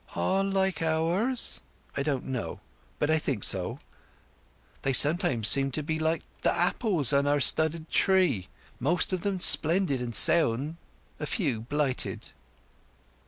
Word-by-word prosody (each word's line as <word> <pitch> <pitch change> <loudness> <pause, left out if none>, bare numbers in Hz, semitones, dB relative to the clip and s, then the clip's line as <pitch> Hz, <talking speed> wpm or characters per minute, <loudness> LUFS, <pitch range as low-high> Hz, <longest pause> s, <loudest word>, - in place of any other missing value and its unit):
"All 140 - -1
like 190 -3 -2
ours?" 170 +10 +1 0.3
"I - - -3
don't 140 -3 -3
know; 130 -3 -6 0.4
but 150 +1 -1
I 160 - +2
think 130 -9 -4
so. 90 -2 0 1.0
They 135 - -2
sometimes 130 - +2
seem 135 +2 +4
to 155 - -3
be 155 +1 -4
like 160 +1 -2 0.2
the - - +1
apples 175 - 0
on 140 0 +1
our 145 0 +1
stubbard 160 +3 +1
tree. 175 - 0 0.3
Most 175 +8 -1
of 185 - -3
them 195 -1 -3
splendid 165 -5 +4
and 120 -2 -5
sound—a 155 +3 +1
few 140 - -2
blighted." 135 +2 -3
155 Hz, 135 wpm, -26 LUFS, 135-175 Hz, 1.0 s, seem